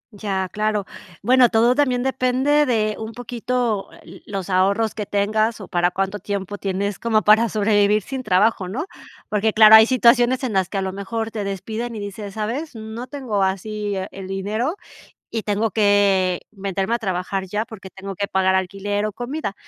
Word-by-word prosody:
Ya, 195 -2 -2
claro. 210 -1 0 0.4
Bueno, 250 +1 +5
todo 235 +2 +4
también 255 -3 +1
depende 265 +3 +2
de 215 -3 +1
un 220 0 -6
poquito, 240 -3 -2
ah, - - -16
eh, - - -13
los 195 -2 -4
ahorros 200 +4 +2
que 210 -2 -5
tengas 215 +2 0
o 195 - -9
para 175 0 +1
cuánto 195 +2 -2
tiempo 200 0 -4
tienes 200 +1 -2
como 220 -2 +1
para 220 +2 +5
sobrevivir 210 -1 +2
sin 265 -1 -5
trabajo, 200 -2 +2
¿no? 265 - -3 0.4
Porque 215 +1 +1
claro, 215 0 +8
hay 220 +1 +10
situaciones 245 +1 +4
en 235 -5 -2
las 190 -2 +1
que 200 - -4
a 195 - 0
lo 190 0 -3
mejor 220 +3 -4
te 210 -2 -4
despiden 220 +4 -4
y - - -5
dices, 205 0 -7
¿sabes? 240 +7 -4
no 220 +3 -7
tengo 250 -9 -3
así 205 +2 -2
e 190 0 -3
el 195 -1 -8
dinero 215 - -2 0.5
y 225 -2 -3
tengo 210 +2 0
que 200 -3 +3
meterme 195 +2 -2
a - - 0
trabajar 190 -2 -3
ya 210 +4 -2
porque 200 -5 -11
tengo 195 0 -8
que 200 +1 -2
pagar 190 0 +2
alquiler 200 +2 -1
o 210 - -3
comida. 245 -1 -4
210 Hz, 185 wpm, -21 LUFS, 195-230 Hz, 0.5 s, hay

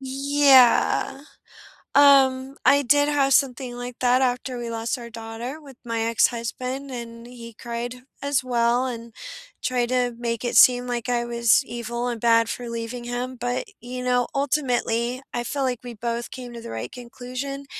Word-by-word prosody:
Yeah, 270 0 +4 0.7
um, 270 -1 +5
I 285 0 +5
did 290 +3 +3
have 275 -2 +2
something 255 -2 +1
like 245 0 -7
that 250 +1 +3
after 250 0 -1
we 235 -1 -5
lost 230 +3 -2
our 235 -1 -9
daughter 230 +5 -7
with 275 -4 -14
my 230 -1 -2
ex-husband, 240 +4 -1
and 235 -2 -8
he 235 -1 -11
cried, 235 +1 -5 0.3
as 280 -2 +1
well, 245 0 +1
and 235 -2 -6 0.5
tried 245 -1 0
to 250 -1 +1
make 235 -1 -3
it 240 - -1
seem 250 0 +6
like 240 -1 -3
I 240 -1 +1
was 235 +2 +3
evil 240 +1 -4
and 235 -2 -3
bad 230 -1 +4
for 245 -1 -5
leaving 235 +1 -5
him, 245 +1 -4
but, 245 +1 -3
you 250 +1 -6
know, 250 -1 +2
ultimately, 255 -3 0
I 240 - -2
feel 280 +3 -3
like 250 -3 -1
we 245 - -6
both 235 +2 -4
came 250 -2 -8
to 235 - -7
the - - -8
right 115 +2 -5
conclusion, 255 +3 -7
245 Hz, 170 wpm, -24 LUFS, 235-260 Hz, 0.7 s, seem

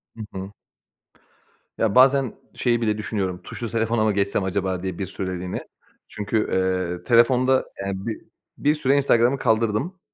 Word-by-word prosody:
Hı 115 - -8 0.2
hı. 95 +1 -6 1.3
Ya, 110 -3 +1
bazen 130 -1 +5 0.2
şeyi 120 -2 +1
bile 105 -2 +1
düşünüyorum; 100 -4 -3
"Tuşlu 115 - -5
telefona 115 0 +1
mı 110 - +3
geçsem 100 0 0
acaba?" 95 -1 -2
diye 95 -2 -4
bir 95 - -1
süreliğine. 90 -1 -5 0.4
Çünkü, 105 +2 -2
ııı, 90 -2 0
telefonda, 125 +3 +4 0.2
yani, 95 0 -4
bi 110 - -4 0.4
bir 150 +1 +2
süre 140 -2 +2
Instagram'ı 130 -1 +3
kaldırdım. 115 - 0
110 Hz, 140 wpm, -23 LUFS, 95-120 Hz, 1.3 s, bazen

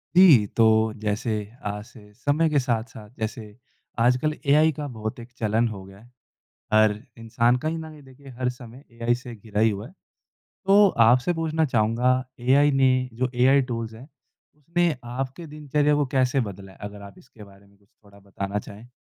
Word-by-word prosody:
जी 160 - +7
तो, 110 -1 +4
जैसे 110 +2 -2 0.3
आज 105 0 -4
से 105 -3 -17
समय 145 +7 +1
के 150 -2 +2
साथ-साथ, 115 -4 -3
जैसे 110 -1 -6 0.4
आजकल 125 +6 +2
एआई 150 +3 +4
का 150 -1 -4
बहुत 110 -3 -6
एक 120 +1 -11
चलन 110 +1 +1
हो 100 -4 -7
गया 95 +1 -15
है। 110 - -18 0.7
हर 110 -1 +4 0.2
इंसान 115 +2 +1
कहीं 160 +5 -3
न 160 -1 -8
कहीं 150 -2 -14
देखिए 135 +1 -16
हर 125 -1 0
समय 125 +1 -9
एआई 115 +1 0
से 120 -1 -8
घिरा 105 -1 -4
ही 110 - +4
हुआ। 105 +2 -5 0.6
तो 200 +1 +3 0.2
आपसे 125 +8 +3
पूछना 160 -1 0
चाहूँगा, 125 +1 +1 0.2
एआई 140 +4 +4
ने 130 -2 +2
जो 125 +3 -1
एआई 135 +3 +4
टूल्स 115 -1 -4
हैं, 120 +5 -12 0.5
उसने 170 +2 0
आपके 130 +7 -5
दिनचर्या 150 0 0
को 145 0 +1
कैसे 130 +2 +2
बदला 95 0 -11
है, - - -19
अगर 105 0 -8
आप 100 -1 -12
इसके 115 -4 -16
बारे 100 0 -18
में 100 0 -26
कुछ 100 0 -32
थोड़ा 100 -1 -18
बताना 100 +1 -4
चाहें? 105 +3 -12
120 Hz, 180 wpm, -24 LUFS, 110-140 Hz, 0.7 s, जी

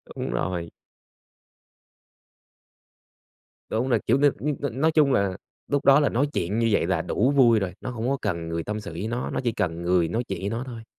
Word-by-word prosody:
Đúng - - -4
rồi. 85 +6 -2 3.0
Đúng 120 +4 -1
rồi, 115 -4 +3
kiểu, - - +4
n - - -2 0.5
n 130 +6 -6
nói 160 - +4
chung 150 -4 +4
là 100 -4 +1 0.3
lúc 145 0 -1
đó 140 +1 +7
là 145 - +2
nói 135 +5 +1
chuyện 95 +6 -1
như 115 0 +2
vậy 100 - +2
là - - +1
đủ 125 +6 +1
vui 120 -5 +5
rồi, 95 -2 -3
nó 130 - -4
hông 120 0 -3
có 140 - +1
cần 85 -5 -2
người 85 0 -2
tâm 105 +3 -4
sự 100 -5 -8
với 85 +6 -4
nó, 120 +2 -3
nó - - -2
chỉ 120 - +1
cần 85 -6 -2
người 90 -1 +2
nói 115 +9 -1
chuyện 95 -3 -4
với 100 - -2
nó 115 +3 -3
thôi. 115 -2 -8
110 Hz, 215 wpm, -25 LUFS, 90-130 Hz, 3.0 s, đó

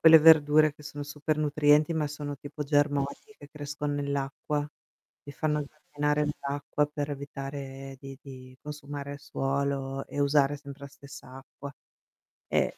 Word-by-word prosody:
quelle 160 0 +10
verdure 155 -1 +7
che 150 - -15
sono 145 0 -6
super 150 +1 -2
nutrienti, 150 +1 +4
ma 155 -2 +1
sono 145 -1 -5
tipo 145 +2 -6
germogli 145 +5 0
che 145 - -12
crescon 145 -1 -3
nell'acqua, 140 +1 -1 0.6
ti 145 - -9
fanno 150 0 0
camminare 150 0 -1
nell'acqua 145 0 -1
per 145 0 -3
evitare 135 -1 -6
di 135 -1 -9
di 130 -2 -11
consumare 145 -1 -6
suolo 135 -1 -1
e 145 - -4
usare 145 0 +4
sempre 140 0 -11
la 140 - -6
stessa 140 -2 -12
acqua. 140 +1 -10 0.8
E - - +1
145 Hz, 140 wpm, -29 LUFS, 140-150 Hz, 0.8 s, quelle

